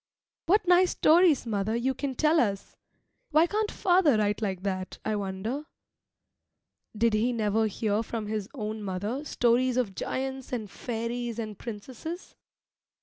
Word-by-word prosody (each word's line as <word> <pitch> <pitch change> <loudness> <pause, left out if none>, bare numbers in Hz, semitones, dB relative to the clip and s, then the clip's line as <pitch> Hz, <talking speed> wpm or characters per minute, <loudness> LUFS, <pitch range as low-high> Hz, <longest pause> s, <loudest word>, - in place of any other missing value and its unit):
What 390 +2 +3
nice 360 +1 +6
stories, 330 -4 +4
mother, 215 -1 -1
you 255 +3 0
can 270 -1 -4
tell 310 +3 +3
us! 200 -6 -1 0.5
Why 315 +2 +5
can't 420 +4 -1
father 350 - +3
write 210 0 0
like 190 -3 -2
that, 185 -2 -3
I 215 - 0
wonder? 205 +8 -3 1.3
Did 230 +1 +3
he 220 +4 +2
never 220 -1 +1
hear 210 0 0
from 225 -1 -4
his 210 -1 -3
own 215 0 -4
mother 205 +8 -3
stories 250 -1 +2
of 230 -6 0
giants 265 +5 -4
and 220 -5 -4
fairies 235 0 -4
and 215 -2 -4
princesses? 245 - -7
230 Hz, 145 wpm, -28 LUFS, 210-270 Hz, 1.3 s, nice